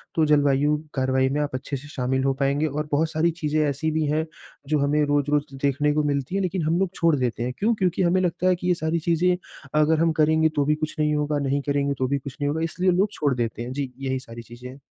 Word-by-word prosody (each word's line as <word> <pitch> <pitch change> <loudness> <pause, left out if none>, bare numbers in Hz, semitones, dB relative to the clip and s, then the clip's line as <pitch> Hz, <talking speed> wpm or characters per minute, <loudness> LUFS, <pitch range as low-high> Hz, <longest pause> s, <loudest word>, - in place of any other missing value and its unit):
तो 160 -1 +3
जलवायु 145 0 +3 0.2
कार्रवाई 130 -1 +1
में 145 +2 0
आप 145 -3 -2
अच्छे 135 +2 -4
से 145 +3 -12
शामिल 130 -1 -1
हो 135 0 +2
पाएँगे 140 +3 +1
और 150 +1 -3
बहुत 155 +2 +1
सारी 165 +2 +1
चीज़ें 155 0 0
ऐसी 155 +3 -1
भी 155 0 0
हैं, 155 +1 0 0.4
जो 150 -1 +1
हमें 145 +2 +2
रोज़-रोज़ 145 0 0
देखने 145 +1 +2
को 150 0 +1
मिलती 140 +4 -1
हैं 195 - +1
लेकिन 185 -2 -1
हम 165 +2 +1
लोग 190 -2 0
छोड़ 165 -3 +3
देते 120 -3 -1
हैं। 125 +1 -2
क्यों? 225 +3 +2
क्योंकि 185 -2 0
हमें 180 +2 +3
लगता 180 0 0
है 185 - +4
कि 180 +1 -5
ये 180 - +4
सारी 160 +1 +1
चीज़ें 180 +2 +3 0.5
अगर 155 +1 +3
हम 165 0 +3
करेंगे 160 +1 +4
तो 145 -1 +2
भी 150 +1 +2
कुछ 155 +1 -4
नहीं 150 0 +2
होगा, 150 0 0
नहीं 140 0 0
करेंगे 140 0 0
तो 130 - 0
भी 140 +1 0
कुछ 135 +1 -9
नहीं 145 - +1
होगा, 160 +2 -2
इसलिए 180 +3 +1
लोग 190 +3 +2
छोड़ 145 -8 0
देते 115 -1 -3
हैं। 120 +2 -5
जी, 135 -2 -3
यही 130 -1 -2
सारी 115 -2 -10
चीज़ें 120 +2 -11
हैं। 135 +2 -12
150 Hz, 255 wpm, -24 LUFS, 135-160 Hz, 0.5 s, है